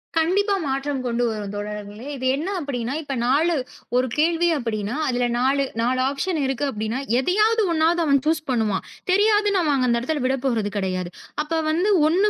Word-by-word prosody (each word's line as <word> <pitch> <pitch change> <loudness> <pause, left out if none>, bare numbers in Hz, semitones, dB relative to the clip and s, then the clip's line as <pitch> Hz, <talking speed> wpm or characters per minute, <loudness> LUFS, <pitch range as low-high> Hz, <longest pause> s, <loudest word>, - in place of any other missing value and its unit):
கண்டிப்பா 380 +6 +2
மாற்றம் 275 0 -2
கொண்டு 240 0 0
வரும் 210 -2 -4
தோழர்களே. 210 +2 -6
இது 260 - -5
என்ன 305 +6 -3
அப்படின்னா 260 -5 -3
இப்ப 280 -3 -5
4 310 +7 +3 0.4
ஒரு 255 +1 +3
கேள்வி 335 +2 +3
அப்படின்னா 220 -3 -3
அதுல 245 -1 +1
4- 270 +2 +2 0.2
4 250 +2 +1
ஆப்ஷன் 310 +5 -2
இருக்கு. 270 +1 -1
அப்படின்னா 220 +3 -3 0.2
எதையாவது 430 - +3
1வது 330 +1 +2
அவன் 280 -2 +4
சூஸ் 315 0 +2
பண்ணுவான். 220 -6 0 0.3
தெரியாதுன்னா 415 0 +3 0.3
அந்த 235 - +3
இடத்துல 290 +4 -2
விடப்போறது 255 -5 0
கெடையாது. 185 -2 -2 0.3
அப்ப 305 +2 -4 0.2
வந்து 345 +6 +1 0.2
1 375 +6 +3
270 Hz, 155 wpm, -23 LUFS, 235-330 Hz, 0.4 s, அவன்